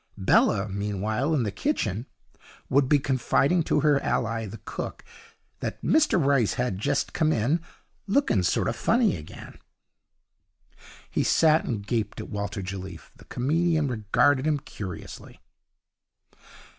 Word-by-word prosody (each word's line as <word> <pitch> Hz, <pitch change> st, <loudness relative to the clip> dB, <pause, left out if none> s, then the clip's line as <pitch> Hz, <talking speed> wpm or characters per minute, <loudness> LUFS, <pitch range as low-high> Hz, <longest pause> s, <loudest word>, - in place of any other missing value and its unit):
Bella, 100 Hz, +1 st, +3 dB
meanwhile, 105 Hz, +7 st, -2 dB
in 130 Hz, -, +1 dB
the 105 Hz, -, -2 dB
kitchen, 115 Hz, -, -2 dB, 0.6 s
would 135 Hz, 0 st, +3 dB
be 150 Hz, -, +5 dB
confiding 140 Hz, +5 st, +1 dB
to -, -, +1 dB
her 145 Hz, -2 st, +3 dB
ally 115 Hz, -1 st, -1 dB
the 105 Hz, +3 st, -8 dB
cook -, -, -6 dB, 0.5 s
that -, -, -4 dB
'Mr 305 Hz, 0 st, +3 dB
Rice 140 Hz, -7 st, +2 dB
had 120 Hz, -7 st, -2 dB
jest -, -, -1 dB
come 155 Hz, -2 st, +2 dB
in, 140 Hz, +7 st, +1 dB, 0.5 s
lookin' 200 Hz, -, +2 dB
sort 90 Hz, -, +1 dB
o' 115 Hz, -, 0 dB
funny 225 Hz, -, +2 dB
again'. 75 Hz, -, -11 dB, 1.5 s
He -, -, -1 dB
sat 160 Hz, 0 st, +3 dB
and 105 Hz, -5 st, -3 dB
gaped 110 Hz, -2 st, -2 dB
at -, -, -7 dB
Walter 100 Hz, 0 st, -4 dB
Jelliffe. 95 Hz, -2 st, -7 dB
The -, -, -17 dB
comedian 155 Hz, +3 st, 0 dB
regarded 130 Hz, +5 st, +2 dB
him 150 Hz, -1 st, +2 dB
curiously. 95 Hz, -9 st, -9 dB
120 Hz, 130 wpm, -26 LUFS, 105-155 Hz, 1.5 s, be